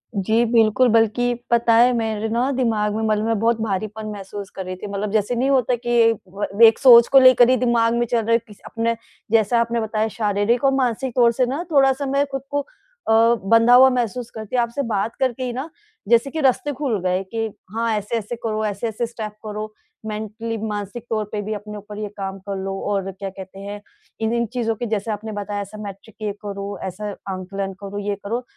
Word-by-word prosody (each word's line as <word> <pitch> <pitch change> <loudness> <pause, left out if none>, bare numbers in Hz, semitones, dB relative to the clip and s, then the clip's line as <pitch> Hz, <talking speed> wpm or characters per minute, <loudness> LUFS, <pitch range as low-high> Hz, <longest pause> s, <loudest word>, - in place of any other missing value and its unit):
जी 220 +4 +2
बिल्कुल, 230 +2 +4
बल्कि 230 +2 +2 0.2
पता 235 -1 +4
है, 240 +2 +6
मेरे 220 -1 -1
ना 240 +4 +1
दिमाग 220 -5 0
में 220 - -2
मतलब 215 -1 +1
मैं 225 -1 +1
बहुत 230 +1 +2
भारीपन 215 +1 -3
महसूस 200 0 -7
कर 190 - -5
रही 185 0 -5
थी। 205 +3 -8
मतलब 200 +1 -3
जैसे 215 +3 +1
नहीं 260 +3 +1
होता 255 -2 +2
कि 240 0 -7 0.2
एक 225 - 0
ब 200 +3 -4
एक 225 -1 +5
सोच 235 -3 +8
को 270 - +7
लेकर 255 -1 +7
ही 255 - +5
दिमाग 230 -1 +2
में 240 - +1
चल 240 0 0
रहा 225 - -2
है 230 - +6
किस 210 - -15
अपना 230 0 -1 0.4
जैसा 225 +1 +3
आपने 235 0 -1
बताया 220 0 -1
शारीरिक 210 +3 +1
और 270 - +4
मानसिक 255 -1 0
तौर 240 -2 +5
से 250 +2 +1
ना 275 +7 -3
थोड़ा-सा 270 -1 +3
मैं 275 +1 +1
खुद 270 0 -3
को 285 0 +1
अ, - - -9 0.4
बँधा 230 +1 +6
हुआ 260 +1 +8
महसूस 245 -1 -2
करती। 220 +2 -6
आपसे 240 +2 0
बात 215 +1 -1
करके 260 -1 0
ही 250 -1 -3
ना, 265 +6 -5 0.4
जैसे 235 +3 +4
कि 315 - -3
रास्ते 275 +2 +2
खुल 255 -7 -1
गए 185 +1 0
कि 225 +3 -3 0.3
हाँ, 230 0 0
ऐसे-ऐसे 215 +2 -3
करो, 215 -1 -1
ऐसे-ऐसे 215 +3 -2
स्टेप 225 -2 -6
करो, 215 0 -5 0.3
मेंटली 220 +1 -4
मानसिक 210 +2 -5
तौर 215 -2 -1
पे 210 - -2
भी 210 +1 -4
अपने 210 0 -7
ऊपर 210 0 -10
ये 210 - -3
काम 195 -1 -4
कर 195 - -2
लो। 195 0 -4 0.2
और 195 -1 -1
क्या 195 +1 -6
कहते 190 0 -11
हैं, 205 +1 -7 0.4
इन-इन 235 +1 0
चीज़ों 230 -3 -1
के, 240 - -4
जैसे 215 0 -2
आपने 215 +1 -5
बताया, 205 0 -4
ऐसा 200 +2 -9
मैट्रिक 200 +2 -10
ये 210 - -1
करो, 200 0 -5
ऐसा 205 +3 -5 0.2
आकलन 195 +1 -5
करो, 200 0 -5
ये 200 - 0
करो। 235 +5 -3
225 Hz, 210 wpm, -21 LUFS, 205-240 Hz, 0.4 s, सोच